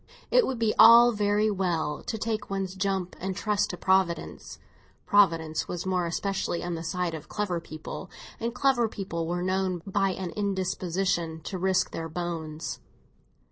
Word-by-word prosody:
It - - +5
would 265 - -2
be 225 -2 +1
all 235 +2 +9
very 210 0 +1
well 170 -6 -1
to 220 - -2
take 215 -1 -3
one's 195 -1 -2
jump 190 -1 -2
and 190 +1 -3
trust 210 0 0
to 180 - -5
Providence; 185 -4 0 0.5
Providence 165 -6 +3
was 175 0 -4
more 180 -2 0
especially 190 0 -2
on 175 0 -3
the 165 - -4
side 175 +1 -2
of 160 - -8
clever 200 -5 -2
people, 155 +4 -8 0.3
and 235 +1 -2
clever 250 -2 +2
people 170 -6 -4
were 175 +1 -2
known 185 -2 -1
by 195 -1 +1
an 180 -2 -5
indisposition 185 -4 -1
to 185 +4 -5
risk 190 0 +1
their 165 0 -5
bones. 160 -2 -4
190 Hz, 160 wpm, -27 LUFS, 170-205 Hz, 0.5 s, all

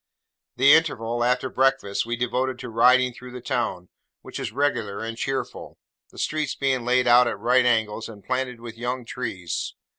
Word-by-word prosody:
The 135 +4 +6
interval, 120 -7 +1
after 125 +2 +1
breakfast, 130 -6 +1
we 120 - -1
devoted 125 +2 -1
to 125 - -7
riding 125 +2 +4
through 125 +1 -11
the 125 - -6
town, 110 -7 -3 0.3
which - - -7
is - - -4
regular 115 -6 -1
and 115 0 -4
cheerful: 135 +3 -4 0.3
the - - -18
streets 155 -1 -1
being 130 -3 0
laid 125 +1 +3
out 120 0 +6
at 115 - -2
right 125 +4 +3
angles, 110 -2 0
and 105 -3 -12
planted 130 -2 -2
with 115 -1 -10
young 125 +1 -3
trees. 105 -9 -4
125 Hz, 175 wpm, -24 LUFS, 115-130 Hz, 0.3 s, The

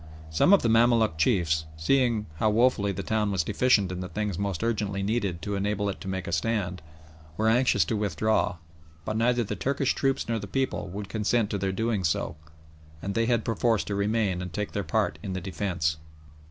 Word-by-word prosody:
Some 80 - +4
of 200 - +6
the - - +2
Mamaluk 115 -6 +3
chiefs, 80 -5 +2
seeing 115 +5 +2
how 110 - +2
woefully 110 -2 +3
the 100 0 -5
town 105 0 0
was 95 -3 +1
deficient 105 0 +2
in 90 - -4
the 90 0 -5
things 105 +1 -2
most 100 -1 -2
urgently 105 -4 -1
needed 100 -6 -1
to 100 - -3
enable 100 +1 -1
it 100 - -6
to - - -7
make 95 -1 -3
a - - -4
stand, 90 0 -1 0.6
were 110 - +1
anxious 125 +3 +3
to 115 - -1
withdraw, 105 0 0 0.5
but 110 - -2
neither 120 +2 +2
the 100 - -4
Turkish 140 0 0
troops 135 -1 0
nor 115 -1 -1
the 100 - -7
people 130 +2 -1
would 100 +3 -6
consent 110 +1 0
to 100 - -1
their 95 0 0
doing 110 0 -1
so, 85 -2 -1 0.6
and 100 +4 -4
they 115 +1 +1
had 120 -2 +1
perforce 115 -1 +1
to 100 - -4
remain 100 -2 0
and 90 -1 -6
take 105 +4 -3
their - - -2
part 75 - 0
in 95 - -4
the 95 - -2
defence. 85 -3 -1
105 Hz, 205 wpm, -27 LUFS, 95-115 Hz, 0.6 s, of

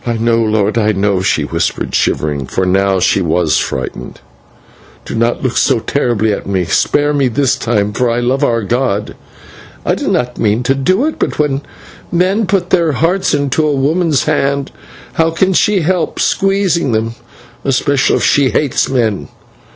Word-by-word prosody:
"I 120 -1 -2
know, 115 +1 +1
lord, 110 0 +1
I 110 -1 +2
know," 100 -1 0
she - - +1
whispered, - - -2
shivering, 70 -3 -1
for 95 - -1
now 95 +1 +2
she 95 - +2
was 85 -2 +1
frightened. 60 - -5 0.9
"Do - - -6
not 115 +1 0
look 130 -2 -1
so 130 - +3
terribly 110 -3 0
at - - -5
me; 95 -2 0
spare 145 - +1
me 140 -2 +2
this 130 +2 +1
time 105 -5 -1
for 120 0 0
the 120 - -1
love 130 +3 0
of 115 -4 0
God! 105 -3 -1 0.7
I - - +2
did - - -2
not 125 0 -1
mean 110 +3 +1
to 135 - +2
do 185 - +1
it, 315 - -3
but - - -1
when 145 -2 0 0.5
men 185 +5 +1
put 185 -2 0
their 170 -4 +2
hearts 165 +5 +1
into 145 +2 0
a 150 -2 +1
woman's 150 +1 +1
hand, 140 -2 -1 0.4
how 165 0 +2
can 190 +4 +1
she 200 +1 +2
help 180 +2 -1
squeezing 195 - +1
them, 110 +1 -1 0.5
especially 135 +1 +1
if - - -1
she 140 -2 +3
hates 135 +4 0
men? 115 -6 0
130 Hz, 175 wpm, -14 LUFS, 110-155 Hz, 0.9 s, so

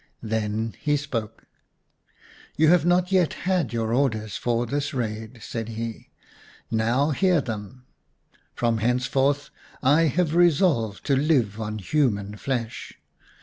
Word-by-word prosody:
Then 110 0 -2
he 145 0 +1
spoke. 125 -7 -5 1.1
"You 155 0 +5
have 175 -1 +4
not 180 +1 +2
yet 185 -4 +3
had 180 -7 +1
your 115 -1 -1
orders 110 -5 0
for 120 0 0
this 140 +3 -2
raid," 110 0 -4
said 115 -1 -5
he. 115 0 -6 0.3
" - - -24 0.3
Now, 115 +7 +2
hear 180 +3 +3
them! 120 0 -6 0.7
From 115 -2 +1
henceforth 130 +4 +1 0.3
I 150 +5 +4
have 160 +1 0
resolved 160 - +2
to 140 - +2
live 130 -8 +1
on 105 0 -3
human 105 -4 0
flesh. 120 -2 -4
125 Hz, 130 wpm, -25 LUFS, 110-150 Hz, 1.1 s, You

